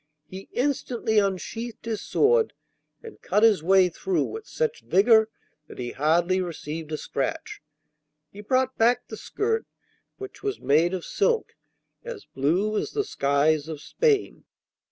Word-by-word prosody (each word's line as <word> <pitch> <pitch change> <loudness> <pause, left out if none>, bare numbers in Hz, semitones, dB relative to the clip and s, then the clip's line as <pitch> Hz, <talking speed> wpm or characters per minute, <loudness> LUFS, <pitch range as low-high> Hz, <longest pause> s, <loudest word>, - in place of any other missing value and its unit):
He 190 +5 -10
instantly 245 -5 0
unsheathed 215 +5 -3
his 225 -2 -3
sword 460 +1 +2 0.5
and 450 -2 -12
cut 210 +4 +1
his 215 -7 +5
way 190 +2 +5
through 350 - -1
with 440 +1 -7
such 475 -1 -2
vigour 220 +3 +4 0.4
that - - -12
he 120 -1 -4
hardly 170 +6 +2
received 160 -2 -6
a 155 - -2
scratch. 135 -2 -4 0.7
He 205 - -10
brought 260 +4 +1
back 240 +2 +2
the - - -6
skirt, 450 +2 -2 0.5
which 400 0 -9
was 405 -1 -3
made 165 +6 +2
of 180 - -6
silk 465 -2 0 0.5
as 480 -4 -8
blue 180 +11 0
as - - -5
the 420 0 0
skies 145 - +1
of 160 -2 -6
Spain. 430 - 0
210 Hz, 145 wpm, -25 LUFS, -, 0.7 s, his